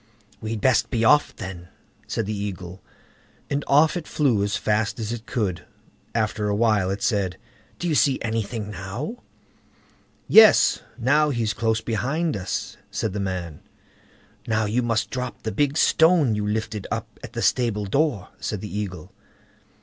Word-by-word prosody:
"We'd 110 -1 -4
best 120 -2 +3
be 115 -3 0
off 145 +5 +4
then", 90 -2 -7 0.4
said 115 - -2
the 105 +1 -3
Eagle; 95 -2 -6 0.7
and 140 0 0
off 150 +4 +4
it 175 -3 -4
flew 125 -9 +2
as 100 - 0
fast 105 +1 0
as 110 0 -3
it 120 0 -6
could. 100 -8 -2 0.5
After 110 -2 0
a 100 - +1
while 105 -4 +2
it 100 +1 -3
said: 95 -5 0 0.4
"Do 175 - -3
you 165 - +1
see 140 -2 +3
anything 110 -1 -3
now?" 105 - -5 1.1
"Yes! 220 -1 +7 0.2
now 145 +5 +3
he's 115 -6 0
close 110 -1 0
behind 140 +9 -1
us", 95 -3 -4
said 110 - -2
the 105 - -3
man. 90 -5 -4 0.9
"Now, 110 -1 +1
you 110 +4 +1
must 115 -3 -1
drop 125 -1 -5
the 110 - -2
big 145 +2 0
stone 160 -8 +4
you 105 -1 -1
lifted 105 -1 -3
up 115 -1 -5
at 120 -1 -9
the 115 - -3
stable 115 -5 +1
door", 105 - 0
said 105 - -3
the 105 - -6
Eagle. 95 -6 -5
110 Hz, 160 wpm, -24 LUFS, 100-125 Hz, 1.1 s, Yes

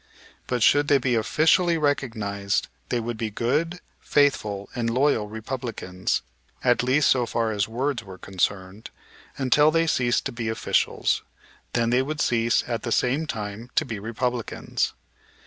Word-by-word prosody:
But 125 -3 0
should 145 +3 +5
they 145 - +5
be 125 -1 0
officially 160 - +3
recognized 110 -9 -1 0.2
they 120 - 0
would 115 0 -4
be 110 0 -2
good, 155 - -1 0.2
faithful, 105 -9 +1
and 115 -1 -1
loyal 125 -4 +2
Republicans, 110 -5 -3 0.4
at 125 -1 +3
least 130 +4 +3
so 125 -2 +3
far 115 -1 0
as 100 -2 0
words 125 +1 -2
were 95 -3 -10
concerned, 95 +2 -3 0.5
until 140 +3 +4
they 165 +1 +2
ceased 125 -6 +1
to 140 - -2
be 120 -2 -3
officials, 110 - +1 0.5
when 115 -1 +2
they 125 +1 +4
would 150 +3 -4
cease 115 -3 +2
at 115 -3 -3
the 115 - -4
same 135 +8 +1
time 105 0 -5
to 155 - +3
be 110 -6 -5
Republicans. 115 +2 -2
120 Hz, 150 wpm, -25 LUFS, 110-140 Hz, 0.5 s, should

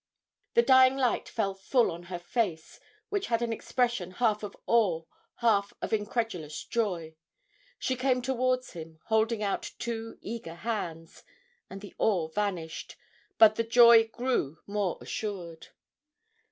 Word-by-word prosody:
The 470 - +6
dying 260 0 +6
light 255 -3 0
fell 200 -4 -1
full 225 +6 +1
on 170 +1 -7
her 180 - -3
face, 175 -2 -3 0.3
which 405 -1 -1
had 235 0 0
an 230 -1 -1
expression 240 -5 -1
half 215 0 +1
of 205 -2 -7
awe, 195 -9 +2 0.3
half 205 -4 +2
of - - -4
incredulous 210 -8 -2
joy 180 -9 -2 0.6
she 260 - -1
came 255 -1 +1
towards 255 0 0
him, 160 -2 -10
holding 220 0 +2
out 200 - -2
two 225 -1 -5
eager 210 -7 -7
hands, 170 -5 -5 0.5
and 195 +1 -8
the 205 - -10
awe 175 -7 +1
vanished, 180 -4 -3 0.4
but 215 -1 +7
the 230 - +2
joy 230 -1 +7
grew 230 - -1
more 200 -3 -1
assured. 180 -6 -5
220 Hz, 140 wpm, -29 LUFS, 180-235 Hz, 0.6 s, but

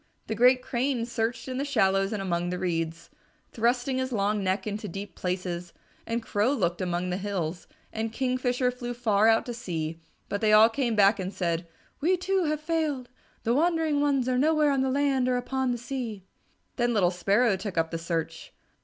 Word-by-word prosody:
The - - -3
great 250 +3 +4
Crane 250 -1 -1
searched 235 +1 -2
in 255 -1 -4
the - - 0
shallows 195 -8 +2
and 210 -3 -2
among 175 -1 -1
the 180 - -2
reeds, 165 -2 -3 0.4
thrusting 245 +3 +1
his 260 0 -2
long 205 -2 0
neck 190 +1 0
into 210 0 -4
deep 195 +2 -7
places, 180 -1 -4 0.3
and 230 0 -2
Crow 220 +4 +1
looked 175 -8 0
among 180 0 -1
the 180 - -1
hills, 185 -4 -3 0.3
and 220 0 -2
Kingfisher 250 0 0
flew 245 -1 -6
far 220 -3 +3
out 225 0 +4
to 245 - -4
sea, 165 -8 -4 0.3
but 200 - -3
they 215 -1 +4
all 215 +1 +8
came 235 -1 -1
back 200 0 +5
and 185 0 -3
said, 170 -3 -2 0.3
"We, 360 +5 +2
too, 375 0 0
have 305 0 -1
failed. 305 -6 -1 0.3
The 230 - +2
wandering 320 0 +2
ones 275 -3 +2
are 250 -1 +1
nowhere 305 0 +3
on 275 -1 +1
the 265 - +1
land 270 -2 +1
or 250 - +2
upon 260 +1 -1
the 240 - -1
sea." 240 -5 -5 0.5
Then 240 -1 +1
little 180 -4 +3
Sparrow 200 +5 +2
took 190 -1 -6
up 165 0 +1
the 165 - -3
search. 165 -1 -4
225 Hz, 195 wpm, -27 LUFS, 190-260 Hz, 0.5 s, all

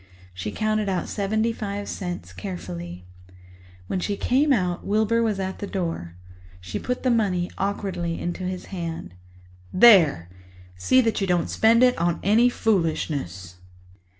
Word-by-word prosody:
She 90 +4 -5
counted 215 - 0
out 185 -2 -1
seventy 220 +3 0
five 205 -2 -5
cents 175 -2 -5
carefully. 90 - -7 0.8
When 185 - -2
she 200 +2 -2
came 280 +4 +2
out, 180 -8 +1
Wilbur 220 +3 +1
was 215 -4 0
at 190 0 -4
the 200 - -4
door. 165 - -4 0.4
She 90 +3 -5
put 250 0 -3
the 255 - +3
money 190 -6 +1
awkwardly 190 -4 -2
into 175 +1 -4
his 185 0 -4
hand. 165 - -5 0.6
"There, 170 - +6 0.5
see 255 - +3
that 225 -3 0
you 195 - 0
don't 175 -2 +1
spend 230 +2 +4
it 250 0 +5
on 170 0 0
any 225 +5 +4
foolishness." 145 - -1
190 Hz, 145 wpm, -24 LUFS, 165-215 Hz, 0.8 s, There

